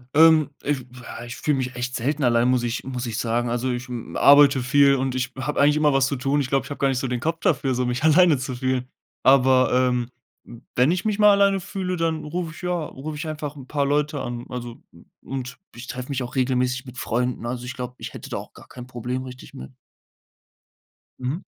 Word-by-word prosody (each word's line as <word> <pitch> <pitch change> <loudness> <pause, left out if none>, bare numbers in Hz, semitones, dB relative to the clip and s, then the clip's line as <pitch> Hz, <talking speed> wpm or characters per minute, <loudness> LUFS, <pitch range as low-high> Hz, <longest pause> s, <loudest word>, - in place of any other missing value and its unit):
Ähm, 160 -2 +6
ich 140 -4 -1 0.2
ja 120 0 -8
ich 120 0 -7
fühle 150 +2 0
mich 130 -1 -3
echt 125 +1 -3
selten 140 +5 -1
allein, 120 -1 +3
muss 125 -1 +2
ich 120 0 -2
muss 130 -1 -4
ich 115 -3 -4
sagen. 120 +1 0
Also, 120 +2 -1
ich, 120 +1 -4
hm, 120 -2 -7
arbeite 140 -1 +6
viel, 140 +2 +4
und 130 -1 -1
ich 130 0 -2
habe 135 +3 -2
eigentlich 145 +1 +5
immer 150 -2 +3
was 135 -1 +3
zu 140 - -2
tun. 135 +3 0
Ich 135 - -2
glaube, 135 -1 +1
ich - - -10
habe 145 - -5
gar 140 - +3
nicht 135 -2 0
so 130 - -2
den 125 -1 -2
Kopf 165 +5 -2
dafür, 130 -2 +1
so 125 +1 0
mich 125 +3 -2
alleine 160 0 +5
zu 130 0 -4
fühlen. 130 0 -1 0.4
Aber, 130 -1 +5
ähm, 125 -1 +1 0.7
wenn 125 +5 +4
ich 180 0 -1
mich 215 -1 -1
mal 210 0 +7
alleine 200 -1 +3
fühle, 185 -1 -4
dann 165 -1 -1
rufe 165 +1 -4
ich - - -11
ja, 180 -1 -2
rufe 150 +2 -7
ich 160 +2 -5
einfach 150 -1 -5
'n 135 -2 -11
paar 145 0 0
Leute 145 0 0
an. 120 -1 -5
Also, 120 -2 -7
u - - -17 0.2
und 130 -2 -6 0.2
ich 120 +1 -9
treffe 125 +1 -6
mich 135 -2 -2
auch 125 0 -8
regelmäßig 125 0 0
mit 125 -1 -11
Freunden. 120 +2 -2
Also, 120 +1 -4
ich 125 - -5
glaube, 125 0 -6
ich - - -8
hätte - - -9
da - - -3
auch - - -9
gar - - -15
kein 125 -1 -10
Problem 125 +1 -4
richtig 125 0 -11
mehr. 65 +1 -9 1.5
Mhm. 130 +8 -3
130 Hz, 235 wpm, -23 LUFS, 125-145 Hz, 1.5 s, mal